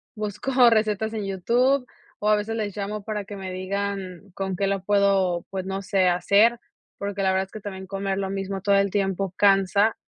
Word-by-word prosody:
busco 240 +4 +2
recetas 220 -1 +1
en 215 -2 -3
YouTube 245 +8 +1 0.3
o 210 - 0
a 215 - +6
veces 210 +2 -2
les 210 -3 -3
llamo 205 0 -4
para 210 -1 -4
que 205 +1 -8
me 190 -1 -6
digan 195 0 -4
con 190 0 -3
qué 195 +2 0
lo 195 -1 -1
puedo, 195 -3 +2
pues, 190 -1 -4
no 195 +1 -3
sé 190 -1 +2
hacer, 205 +7 +3 0.4
porque 200 0 -4
la 190 - +3
verdad 190 0 +1
es 190 - -26
que 215 - -8
también 190 -2 -7
comer 195 0 -2
lo 195 -1 -2
mismo 195 0 -4
todo 200 0 +3
el 200 0 +3
tiempo 195 -2 -1
cansa, 200 +2 +3
200 Hz, 200 wpm, -24 LUFS, 190-210 Hz, 0.4 s, a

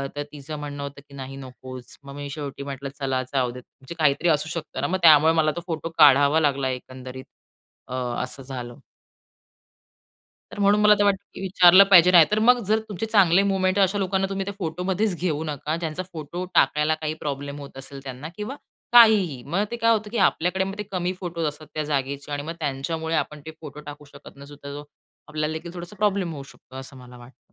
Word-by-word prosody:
तर 145 - -3
तिचं 150 +1 -8
म्हणणं 145 -1 -6
होतं, 140 0 -8
की - - -16
"नाही, 135 0 -7
नकोच." 130 -1 -10
मग 140 0 -10
मी 145 0 -6
शेवटी 140 -1 -6
म्हटलं, 140 -1 -6
"चला 135 -2 -1
जाऊ 130 -3 +1
देत." 125 +1 -10 0.2
म्हणजे 135 +5 -10
काहीतरी 155 +3 +2
असू 155 0 +1
शकतं 165 -1 -5
ना. - - 0
मग 185 - 0
त्यामुळे 160 0 +7
मला 155 -1 +2
तो 175 - -4
फोटो 165 -1 -4
काढावा 145 0 +6
लागला. 140 -3 +1
एकंदरीत 130 0 -8 0.6
अ, 125 - -8 0.3
असं 130 +1 -6
झालं. 125 -2 -7 1.7
तर - - -9
म्हणून 205 +1 +4
मला 210 0 +7
तर - - +4
वाटतं, 200 -1 +3 0.2
की - - -9
विचारलं 185 0 +7
पाहिजे 180 -1 +8
नाही 170 -3 +8
तर 215 - +2
मग 245 +3 +5
जर 220 +1 +3
तुमचे 205 +1 -4
चांगले 195 -4 +4
मोमेंट 190 -1 +1
आहे, 200 - +5
अशा 190 +2 +1
लोकांना 190 0 0
तुम्ही 195 0 -3
त्या 200 - -5
फोटोमध्येच 180 +4 -1
घेऊ 160 -4 -1
नका, 150 0 -3
ज्यांचा 165 +1 -4
फोटो 170 +3 -5
टाकायला 150 +3 +3
काही 155 0 -2
प्रॉब्लेम 140 0 -4
होत 140 -1 -11
असेल 135 +1 -9
त्यांना 135 +2 -7
किंवा 210 +6 -5 0.4
काहीही. 210 - +6
मग 175 +8 -1
ते - - -2
काय 230 0 +3
होतं, 215 -2 0
की 235 - -4
आपल्याकडे 180 +3 -1
मग 195 +1 -5
ते 210 - -3
कमी 180 -1 -1
फोटोज 170 -3 -4
असतात 150 +1 -7
त्या 155 - -2
जागेचे 140 0 -3
आणि 145 0 -3
मग 165 - -5
त्यांच्यामुळे 160 +3 -3
आपण 150 -1 -2
ते 160 - -6
फोटो 150 -2 -9
टाकू 145 0 -10
शकत 140 0 -14
नसू 140 +1 -12
तर 140 0 -7
तो 145 - -11 0.4
आपल्याला 155 +1 -2
देखील 165 +2 -7
थोडासा 175 +3 -9
प्रॉब्लेम 195 -4 0
होऊ 140 -2 -7
शकतो, 130 -1 -17
असं 135 +1 -9
मला 125 -1 -13
वाटतं. 120 +2 -18
155 Hz, 210 wpm, -24 LUFS, 140-185 Hz, 1.7 s, पाहिजे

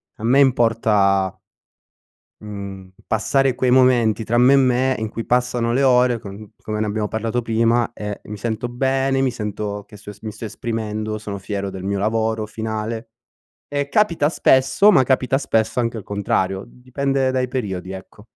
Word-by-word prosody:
a 110 - -12
me 125 +4 +4
importa 105 -7 +2 1.0
mhmm, 100 -2 -8 0.2
passare 135 +4 +1
quei 125 0 +1
momenti 120 -4 +3
tra 120 +3 0
me 125 +3 +6
e - - +7
me 130 0 +2
in 110 - -2
cui 115 +1 -6
passano 125 -1 +1
le 135 +3 +1
ore 125 -2 +4
con 100 +1 -10
come 110 0 -3
ne - - +1
abbiamo 105 0 -2
parlato 115 +3 -2
prima 115 +1 +1
e 105 -1 -6
mi 105 - -7
sento 110 +3 -3
bene, 135 +2 0
mi 130 -2 +1
sento 105 -2 -5
che 105 - -14
so 105 0 -10
mi 110 -1 -5
sto 110 - -11
esprimendo, 110 -1 -4
sono 105 -2 -6
fiero 100 0 -4
del 95 -1 -8
mio 100 +1 -1
lavoro 110 +1 0
finale, 110 +1 -5 0.6
e 145 0 -2
capita 170 -6 +2
spesso, 135 +6 +4
ma 135 - +5
capita 130 0 +1
spesso 110 -2 0
anche 115 -1 -2
il 105 - -7
contrario, 95 -1 -1
dipende 130 +2 -2
dai 130 -1 -1
periodi 95 -8 -4
ecco. 95 +2 -11
115 Hz, 170 wpm, -21 LUFS, 105-125 Hz, 1.0 s, e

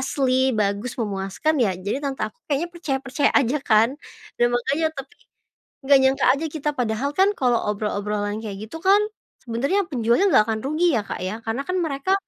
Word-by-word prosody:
asli 260 -2 +1
bagus, 210 +4 -1
memuaskan 210 +7 -1
ya. 195 -6 +1
Jadi 200 +9 -3
tante 275 -2 -2
aku 485 - -9
kayaknya 295 +4 0
percaya-percaya 280 -4 -1
aja 275 +1 +3
kan. 225 -3 +4 0.5
Dan 240 - +5
makanya 285 +6 0
tapi, 275 0 -8 0.7
nggak 275 0 +6
nyangka 265 +1 +2
aja. 280 +4 -2
Kita 300 -1 -2
padahal 250 +1 -1
kan, 385 +6 +4
kalau 245 -3 +2
obrolan-obrolan 210 0 -2
kayak 210 -2 -6
gitu 285 +10 -9
kan, 390 +4 +5 0.4
sebenarnya 275 - 0
penjualnya 235 - +2
nggak 215 - +6
akan 220 -1 -1
rugi 310 +1 +2
ya 210 - -1
Kak - - -6
ya, 185 +4 -3
karena 225 +4 -2
kan 365 - -1
mereka, 280 +4 -1
260 Hz, 175 wpm, -23 LUFS, 215-290 Hz, 0.7 s, nggak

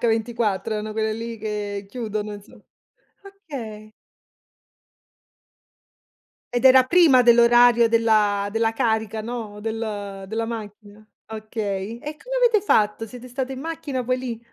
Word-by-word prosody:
H24, 225 -2 0
erano 215 0 -4
quelle 220 0 -1
lì 230 0 -6
che 205 -1 -4
chiudono 215 -3 -4
insom 205 +1 -13 0.6
okay. 270 - -9 2.6
Ed 245 +2 +3
era 260 0 +7
prima 295 -3 +5
dell'orario 240 0 +6
della 215 -3 +2
della 225 0 0
carica, 220 -1 -1
no, 225 -3 -6
del 205 -3 -5
della 225 +1 -2
macchina. 210 -2 -8 0.2
Okay, 215 -1 -5
e 295 +6 -7
come - - -4
avete 475 -4 +4
fatto? 215 - +1
Siete 250 +2 -11
state 260 +1 -4
in 260 - -8
macchina 285 -5 -4
poi 255 +1 0
lì? 245 -3 -5
225 Hz, 125 wpm, -23 LUFS, 215-245 Hz, 2.6 s, era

